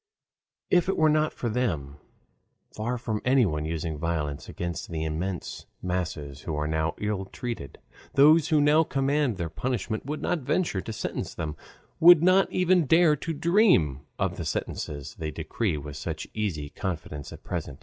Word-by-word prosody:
If 180 +1 +4
it 195 - 0
were 155 -1 +5
not 155 0 +2
for 120 - -4
them, 85 - -1 0.7
far 120 +4 -2
from 110 -3 -3
anyone 110 - +2
using 80 -1 -3
violence 75 -3 -2
against 85 -1 -4
the 80 -2 -3
immense 85 +3 -4
masses 80 -6 -3
who 80 - -4
are 75 0 -1
now 80 0 0
ill 105 -2 -2
treated, 115 - -6 0.4
those 155 +3 +6
who 155 -3 +3
now 150 +2 +5
command 140 -5 0
their 85 -2 -2
punishment 110 +5 -3
would 150 +1 -4
not 175 - 0
venture 135 - 0
to 115 - -6
sentence 110 - -4
them, 75 -2 -4 0.4
would 170 -1 +8
not 185 +2 +4
even 180 -3 +3
dare 165 +1 +5
to 165 - -4
dream 160 - +3 0.2
of - - -1
the - - -4
sentences 70 -1 -4
they 80 -1 -2
decree 85 - -2
with 75 0 -7
such - - -5
easy 85 -10 -2
confidence 80 -6 -5
at - - -11
present. 65 - -4
105 Hz, 165 wpm, -27 LUFS, -, 0.7 s, would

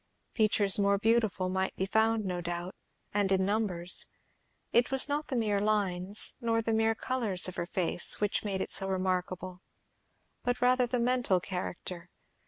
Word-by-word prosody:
Features 210 -3 +3
more 200 0 +3
beautiful 215 -3 +1
might 190 +1 -1
be 190 - -1
found, 220 +1 +2
no 180 -2 -3
doubt, 175 +2 -4 0.4
and 200 -1 +1
in 190 0 +2
numbers; 190 -4 +1 0.7
it 235 +1 +4
was 270 0 +4
not 295 +1 -2
the 260 - -3
mere 210 -4 +1
lines, 200 -2 0
nor 230 -1 +1
the 225 0 -1
mere 225 0 +2
colours 220 -8 0
of 185 - -6
her 170 - -3
face, 175 -1 0
which 210 -1 0
made 195 -3 -2
it - - -1
so 195 - +1
remarkable, 185 -1 -2 0.8
but 245 0 -1
rather 250 0 +3
the 245 +1 -1
mental 240 -6 +2
character. 180 -1 -6
200 Hz, 165 wpm, -30 LUFS, 185-225 Hz, 0.8 s, it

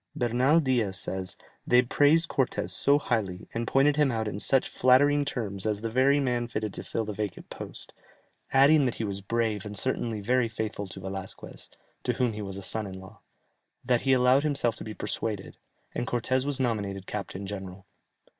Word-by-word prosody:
Bernal 125 +6 +3
Diaz 120 - +1
says, 95 +1 -4 0.3
"They 125 +1 +5
praised 150 +6 +4
Cortès 135 -4 -1
so 140 +1 +3
highly, 105 -10 -2
and 115 0 -2
pointed 140 +2 +3
him 150 -3 +3
out 110 -2 -2
in 100 -1 -4
such 135 +4 +3
flattering 145 +3 +4
terms 105 -7 -2
as 105 -1 -1
the 115 0 -3
very 135 +4 +4
man 120 -3 0
fitted 110 -3 -3
to - - -6
fill 115 - -3
the 105 - -4
vacant 105 -3 -5
post, - - -8 0.6
adding 140 +2 +6
that 120 - -2
he - - -4
was 100 -2 -3
brave 110 -1 -1
and 105 -1 -6
certainly 115 -3 -1
very 120 +3 +1
faithful 110 -2 -4
to 95 +1 -9
Velasquez 95 0 -8 0.3
(to - - 0
whom 125 -3 0
he 105 - -5
was 95 -1 -6
son 110 -2 -1
in 95 -1 -8
law), 95 +4 -13 0.7
that 120 -1 +2
he 135 0 +3
allowed 130 +1 +5
himself 140 -6 0
to - - -7
be 110 -1 -7
persuaded, 105 -1 -4 0.3
and 120 - -3
Cortès 130 +3 0
was 145 -2 0
nominated 100 -6 -2
captain 100 -1 -5
general. 95 -1 -7
115 Hz, 185 wpm, -28 LUFS, 100-130 Hz, 0.7 s, adding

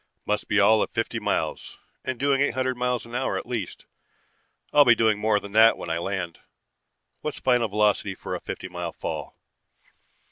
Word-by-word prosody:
Must 105 - -1
be 105 - +2
all 110 +2 +5
of - - 0
fifty - - -2
miles, - - -2 0.3
and 130 -2 -4
doing 140 -1 +2
eight 140 -4 +1
hundred 130 0 0
miles 125 -1 -1
an 115 - -13
hour 130 +2 -1
at - - -5
least. 115 -7 -4 0.9
I'll 145 - +8
be 120 -4 +6
doing 110 -2 +2
more 105 -1 +2
than 100 0 -10
that 110 +2 +6
when 85 - -5
I 85 - 0
land. 95 -2 -4 0.8
What's 150 - -4
final 125 -3 +2
velocity 105 0 +1
for - - -6
a - - -2
fifty - - -6
mile 90 -2 -5
fall? - - -6
110 Hz, 185 wpm, -25 LUFS, 100-125 Hz, 0.9 s, I'll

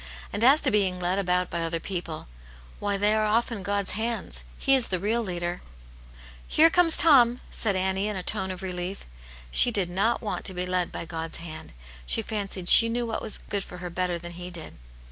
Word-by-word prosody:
And 215 - -2
as 275 +5 +6
to 265 - +4
being 190 -4 +1
led 180 +2 -1
about 180 -1 -1
by 170 - -3
other 165 0 -2
people; 170 - -6 0.5
why, 205 -1 -1
they 205 +2 +2
are 215 0 +1
often 230 0 -1
God's 200 +1 -1
hands. 225 +3 -1
He 270 - +2
is 260 -3 +4
the 185 - -2
real 215 +6 -1
leader.". 175 -3 -4 0.5
" - - -20
Here 325 +1 +4
comes 350 -2 +4
Tom! 250 -6 +5
" - - -22
said 210 -4 -1
Annie, 190 +2 0
in 210 - -4
a 185 - -5
tone 190 +1 +2
of 185 0 -6
relief. 180 +1 -5 0.5
She 245 - +6
did 195 -6 -2
not 220 +7 0
want 210 - -4
to 190 - 0
be 180 0 -3
led 180 -1 -2
by - - -6
God's 165 0 -6
hand; 160 -1 -9 0.4
she 225 - 0
fancied 200 -4 -5
she 230 +4 +9
knew 240 +1 -2
what 225 - -4
was 220 - -1
good 200 -1 -4
for 180 - -11
her 180 0 -7
bettec 175 -1 -3
than 175 0 -9
He 180 +1 -9
did. 170 -3 -10
190 Hz, 220 wpm, -25 LUFS, 180-220 Hz, 0.5 s, she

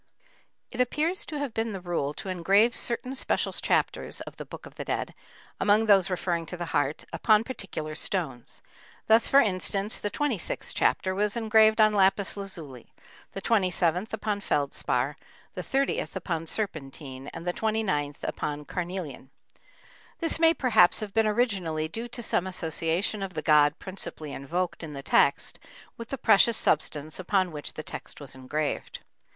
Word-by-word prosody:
] - - -32 0.3
It 250 - 0
appears 310 +8 +1
to 305 - -4
have 285 -5 -3
been 225 -1 -1
the 195 - -4
rule 170 -5 -2
to - - -7
engrave 195 +6 +3
certain 250 +2 -2
special 265 - -1
chapters - - 0
of - - -9
the - - -7
Book - - -10
of - - -12
the - - -6
Dead, - - -2 0.5
among 210 +2 +4
those 195 -4 +5
referring 175 -2 -1
to 180 - -6
the 175 - -3
heart, 145 +1 0
upon 215 -1 +4
particular 195 -11 -5
stones. 155 -7 -3 0.4
Thus, 225 +1 +5
for 275 - +6
instance, 200 -1 0
the 205 - -2
26th 250 - -2
chapter 185 - +2
was 205 +3 0
engraved 220 -1 +5
on 215 -1 +6
lapis 195 0 +3
lazuli, 165 - -4 0.4
the 195 - -6
27th 185 -2 +1
upon 210 -2 -2
feldspar, 140 -3 0 0.4
the - - -4
30th 275 - -1
upon 165 -2 -3
serpentine, 135 -8 -5
and 165 +1 -8
the 175 - 0
29th 190 -11 -1
upon 150 0 -3
carnelian. 170 -6 -5 0.9
This 330 -1 -1
may 330 0 +5
perhaps 220 -11 +4
have 205 -2 -5
been 225 -1 +3
originally 195 -9 0
due 225 +9 -5
to 240 0 -6
some 190 -3 0
association 170 +3 -1
of 195 -2 -5
the - - -3
god 150 0 +5
principally 170 -6 -6
invoked 170 +7 -2
in 160 -3 -6
the 140 -1 -7
text - - +2 0.4
with 230 -1 -8
the 275 - -3
precious 225 0 +5
substance 150 +1 0
upon 185 -1 +1
which 150 -2 -6
the 155 - -6
text - - -8
was 145 -2 -8
engraved. 140 +3 -3
190 Hz, 165 wpm, -27 LUFS, 155-220 Hz, 0.9 s, for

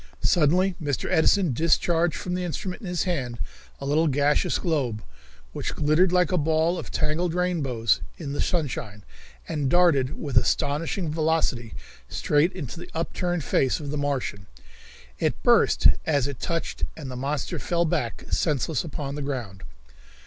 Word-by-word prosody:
Suddenly 180 +3 +3
Mr. 145 -4 -1
Edison 175 -1 +3
discharged 165 +3 +2
from 180 - -4
the 180 0 -1
instrument 180 +4 -4
in 205 - -7
his 175 -1 0
hand 135 -10 -2 0.4
a 140 - -6
little 155 +4 +2
gaseous 145 +1 +2
globe, 135 - -1 0.5
which - - -3
glittered 155 +5 +3
like 180 -2 +3
a 180 - +2
ball 160 +3 +1
of - - -7
tangled 160 +2 -1
rainbows 140 -11 +1 0.2
in 145 -4 -5
the 145 - -1
sunshine, 120 - -2 0.4
and 145 -3 -1
darted 155 -6 +3
with 140 -4 -1
astonishing 155 +6 +1
velocity 155 -7 0 0.3
straight 150 +4 +2
into 165 -3 -6
the - - -9
upturned 170 +1 -1
face 135 +1 +1
of 145 -2 -5
the - - -2
Martian. 135 -9 -2 0.7
It - - -1
burst - - +4 0.2
as 145 -5 +1
it 140 -4 -6
touched 165 -1 -3
and 140 -5 -6
the - - -6
monster 140 +3 -2
fell 170 -1 0
back 120 -7 -2
senseless 150 -1 0
upon 145 -3 -5
the 145 - -4
ground. 120 -9 -4
150 Hz, 155 wpm, -25 LUFS, 140-170 Hz, 0.7 s, burst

